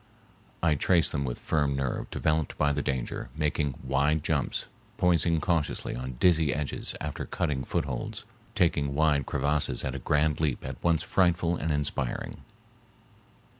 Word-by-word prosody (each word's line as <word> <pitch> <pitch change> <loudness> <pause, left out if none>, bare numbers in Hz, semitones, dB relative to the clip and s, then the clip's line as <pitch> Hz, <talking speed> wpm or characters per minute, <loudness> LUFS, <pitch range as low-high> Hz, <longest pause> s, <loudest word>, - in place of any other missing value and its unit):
I 80 -2 +4
traced 85 +3 +3
them 70 -3 -1
with - - -3
firm 75 -3 0
nerve 70 -2 -2
developed 80 -1 0
by 75 -1 +2
the 75 - 0
danger, 65 -3 -3
making 75 -3 0
wide 70 +3 +1
jumps, 80 -4 0 0.3
poising 85 -2 +3
cautiously 80 -2 0
on 65 +1 -5
dizzy 80 -5 +4
edges 75 -1 -3
after 75 -1 -4
cutting 65 -3 -1
footholds, - - -3 0.3
taking 75 -5 +2
wide 75 -3 +2
crevasses 70 -4 0
at 65 - -2
a 70 - -4
grand 75 +3 +1
leap 75 -5 -1
at 65 -1 -7
once 85 -2 +3
frightful 85 -2 +2
and 80 - -3
inspiring. 75 -4 -2
75 Hz, 145 wpm, -28 LUFS, 70-80 Hz, 0.3 s, I